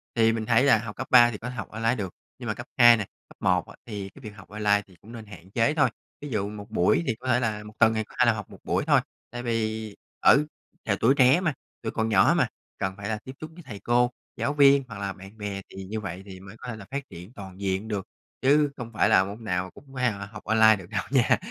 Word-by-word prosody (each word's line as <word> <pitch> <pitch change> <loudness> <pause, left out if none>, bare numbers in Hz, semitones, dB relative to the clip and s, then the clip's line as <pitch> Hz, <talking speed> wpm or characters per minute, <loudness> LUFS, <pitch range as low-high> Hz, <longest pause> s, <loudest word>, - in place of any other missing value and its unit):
thì 115 -1 +4
mình 110 -1 -3
thấy 115 +2 +4
là 140 -5 +6
học 110 -1 -6
cấp 130 - -5
3 120 -1 +7
thì 105 - -6
có 120 +4 -6
thể 125 - -7
học 110 - -6
online 115 +2 0
được, 95 -7 -5 0.3
nhưng - - -7
mà - - 0
cấp - - -9
2 120 -1 +8
này, 100 -3 -4 0.2
cấp - - -17
1 90 -2 +2
á - - -13
thì 100 -4 -6
cái 120 - -17
việc 110 - -6
học 100 -2 -14
online 105 0 +2
thì 95 - -19
cũng 110 - -14
nên 115 -2 -9
hạn 95 -3 -13
chế 115 +7 +2
thôi. 140 -5 +3 0.3
Ví 145 - -6
dụ 105 -4 -1
một 105 0 -9
buổi, 105 - +2
thì 115 - +1
có 130 - -8
thể 120 -1 +3
là 110 -3 -2
một 105 0 -11
tuần 110 -1 +5
thì 110 0 -1
có - - -18
thể 125 - +6
là 120 - +5
học 105 -2 -7
một - - -13
buổi - - 0
thôi. - - +5 0.3
Tại 120 0 -6
vì 110 -2 -2 0.3
ừ, 145 +3 +6 0.4
trời, - - +1
tuổi 125 +4 +5
trẻ 130 +5 +6
mà, 165 -5 0 0.3
tuổi 110 - -3
còn 110 0 -1
nhỏ 110 - +5
mà, - - +3 0.3
cần 95 -1 -2
phải 100 +1 -5
là 110 - -1
tiếp 130 - -7
xúc 155 0 -7
với 175 +1 -13
thầy 110 -8 -9
cô, 120 +3 +2 0.3
giáo 140 - -1
viên 140 -1 +6
hoặc 105 -3 -8
là 100 -1 -3
bạn 95 +3 -13
bè, 100 -2 -4
thì 95 - -8
như 110 +3 -4
vậy 95 -2 -6
thì 95 -2 -10
mới 95 +2 -12
có 125 - -10
thể 120 - -4
là 105 -2 -10
phát 140 +1 -3
triển 90 +7 -11
toàn 95 -4 -10
diện 95 +2 -1
được, 105 -1 -3 0.3
chứ 145 +2 +4
không 120 -2 -7
phải 110 - +3
là 95 - +6
môn 100 +4 -7
nào 90 -3 -2
cũng - - -15
phải 125 -2 +1
là 100 -1 -6
học 105 +1 -11
online 110 0 +5
được 95 -3 -11
đâu - - -2
nha. 130 -4 +4
110 Hz, 285 wpm, -26 LUFS, 100-120 Hz, 0.4 s, 2